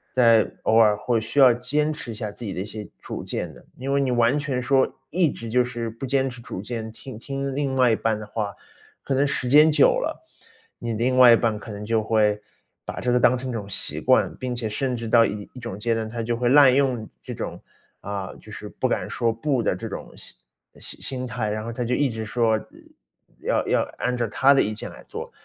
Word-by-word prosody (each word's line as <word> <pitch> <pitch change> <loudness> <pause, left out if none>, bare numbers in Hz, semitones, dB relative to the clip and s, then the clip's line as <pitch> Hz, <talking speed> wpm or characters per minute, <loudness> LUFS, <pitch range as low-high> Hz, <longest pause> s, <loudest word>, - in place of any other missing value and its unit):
在 115 -3 +5
偶 110 - +2
尔 105 -2 +5
会 115 +1 0
需 110 +6 -2
要 130 -3 +8
坚 145 +6 -1
持 150 -5 -9
一 - - -4
下 105 -2 -4
自 120 - -11
己 100 - -4
的 - - -5
一 95 - -3
些 105 0 -8
主 - - -6
见 - - -4
的。 - - -16
因 135 +2 -2
为 140 - +3
你 135 - 0
完 120 +3 +3
全 140 -3 -2
说， 135 +1 +2 0.2
一 170 -2 +2
直 115 -1 -8
就 125 +2 +3
是 120 -2 -4
不 115 +4 -7
坚 135 0 +1
持 125 - -10
主 95 -5 -7
见， 110 0 -5
听 125 +1 -10
听 135 +2 -4
另 140 -2 -1
外 125 -2 +4
一 - - +3
半 110 -1 -1
的 105 - -8
话， 105 -3 -3 0.5
可 135 - -1
能 140 +2 +3
时 130 -3 -2
间 150 +3 +7
久 - - +4
了， - - -4 0.5
你 120 - -4
的 110 - -2
另 130 +2 +1
外 125 -2 +9
一 - - +8
半 115 -2 0
可 105 - -9
能 105 0 -7
就 110 +1 +1
会， 105 -1 +2 0.5
把 - - -5
这 125 - 0
个 125 - +3
当 125 +1 +5
成 130 +1 -5
一 - - -2
种 105 -4 -4
习 100 - -4
惯， - - +3
并 125 -1 -3
且 115 -2 -3
甚 130 +4 -1
至 115 -1 -5
到 115 +1 +5
一 105 -1 -5
一 130 - -10
种 115 -5 -6
阶 115 +1 0
段， 110 -1 -2
他 115 +1 -4
就 115 +1 -1
会 125 - 0
滥 140 -2 +7
用 130 -5 0
这 - - -6
种， - - -5 0.4
啊， 100 -1 -5
就 - - -14
是 - - -8
不 - - -1
敢 - - -2
说 115 -1 0
不 125 +1 -1
的 - - +1
这 - - -6
种 - - -8
心 - - -11 0.4
心 - - -9
心 130 -1 -4
态， 115 -3 -2
然 110 +1 -3
后 115 +1 -5
他 125 - -3
就 120 +1 0
一 145 - +2
直 110 0 -5
说， 110 0 +1 0.8
要 - - 0
要 - - +3 0.2
按 125 0 -1
照 120 -2 -1
他 135 +6 +4
的 135 - +4
意 110 - -1
见 - - -7
来 - - -13
做。 - - -7
120 Hz, 270 characters per minute, -24 LUFS, 110-130 Hz, 0.8 s, 外